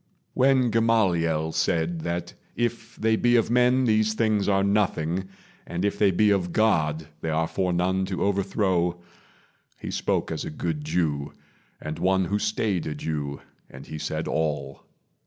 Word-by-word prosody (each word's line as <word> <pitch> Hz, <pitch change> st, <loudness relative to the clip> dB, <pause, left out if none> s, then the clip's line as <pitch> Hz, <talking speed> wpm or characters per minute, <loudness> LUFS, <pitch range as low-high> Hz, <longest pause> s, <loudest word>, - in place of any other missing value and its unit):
When 130 Hz, -2 st, +3 dB
Gamaliel 90 Hz, -9 st, +2 dB
said 80 Hz, +1 st, 0 dB
That 85 Hz, +1 st, -3 dB, 0.2 s
if 115 Hz, 0 st, -3 dB
they 110 Hz, 0 st, +2 dB
be 120 Hz, +2 st, +3 dB
of 115 Hz, -1 st, +2 dB
men 125 Hz, +1 st, +4 dB
these 110 Hz, -1 st, +2 dB
things 110 Hz, -3 st, +1 dB
are 95 Hz, -1 st, +3 dB
nothing, 95 Hz, -3 st, 0 dB, 0.4 s
But 90 Hz, +3 st, -2 dB
if 100 Hz, -, -1 dB
they 105 Hz, -, +5 dB
be 105 Hz, +3 st, +3 dB
of 90 Hz, -3 st, 0 dB
God 80 Hz, -7 st, +1 dB, 0.2 s
they 80 Hz, -, -2 dB
are 80 Hz, +1 st, +1 dB
for 90 Hz, +1 st, -1 dB
none 95 Hz, +2 st, +1 dB
To 95 Hz, -2 st, -2 dB
overthrow, 95 Hz, -3 st, 0 dB, 0.8 s
he -, -, -6 dB
spoke -, -, -1 dB
as -, -, -3 dB
a -, -, -5 dB
good 75 Hz, 0 st, -3 dB
Jew, 75 Hz, -3 st, -1 dB, 0.5 s
And 75 Hz, -, -6 dB
one 95 Hz, 0 st, +2 dB
who 100 Hz, +4 st, -1 dB
stayed 105 Hz, -4 st, -1 dB
a 75 Hz, -, -3 dB
Jew; 75 Hz, -2 st, -4 dB, 0.3 s
and -, -, -11 dB
he 80 Hz, -, -7 dB
said 80 Hz, +1 st, -3 dB
all. 75 Hz, -4 st, -2 dB
95 Hz, 160 wpm, -25 LUFS, 80-110 Hz, 0.8 s, they